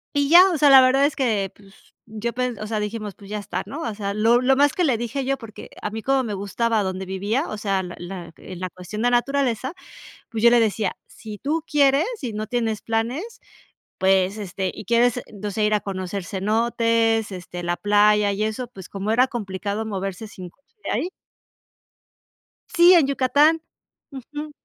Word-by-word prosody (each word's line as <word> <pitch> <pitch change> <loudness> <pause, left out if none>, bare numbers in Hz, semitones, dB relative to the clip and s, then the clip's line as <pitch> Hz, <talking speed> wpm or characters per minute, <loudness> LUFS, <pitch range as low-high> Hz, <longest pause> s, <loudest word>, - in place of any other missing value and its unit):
y 285 0 +2
ya. 360 +3 +8
O 325 - 0
sea, 290 0 +5
la 265 -1 +9
verdad 265 +2 +4
es 290 - 0
que, 215 -7 0
pues, 195 0 -21
yo 220 +1 -4
pen 250 -2 -2
o 215 - -5
sea, 215 -1 -2
dijimos: 210 -1 -5
"Pues, 200 -1 -14
ya 210 - -3
está", 205 - -4
¿no? 300 +4 -7
O 225 -3 -3
sea, 200 -1 -3
lo 230 +3 +3
lo 265 +1 +3
más 290 0 +4
que 360 - 0
le 260 -7 +2
dije 240 +4 -3
yo 275 +1 -1
porque 225 -3 -11
a 210 - -2
mí 220 +1 -5
como 270 +1 +1
me 215 -4 -4
gustaba 210 +2 0
donde 190 0 -4
vivía, 205 - -1
o 215 - -5
sea, 195 -2 0
la 175 0 -8
la 175 -2 -8
eh, 185 - -10
la 185 0 -4
cuestión 185 +5 -7
de - - 0
la 240 - +5
naturaleza, 265 0 -1 0.6
pues, 225 -1 -4
yo 235 - +8
le 240 - +5
decía: 215 -2 0
"Si 215 -2 -10
tú 310 +3 -1
quieres 285 +3 +4 0.2
y 240 -4 -3
no 215 +1 -4
tienes 225 -2 -1
planes, 250 - -3 0.6
pues, 190 +1 +2
este, 190 -1 -3
y - - -9
quieres, 240 +2 +2
no 205 0 -6
sé, 215 +2 -1
ir 215 - +1
a - - +1
conocer 190 0 -4
cenotes, 225 +2 +1
este, 180 -1 -7
la 175 0 -2
playa", 210 0 +3
y 210 +2 -2
eso, 220 +3 -3
pues, 195 -7 -12
como 200 +2 -3
era 250 +3 +4
complicado 205 -1 -4
moverse 195 0 -4
sin 185 -4 -10
coche 280 - -35
de - - -3
ahí 360 - -1 1.6
sí, 350 +2 +6
en 320 -6 +5
Yucatán, 290 +4 +3 0.5
ujú. 295 +3 -7
220 Hz, 205 wpm, -23 LUFS, 200-260 Hz, 1.6 s, la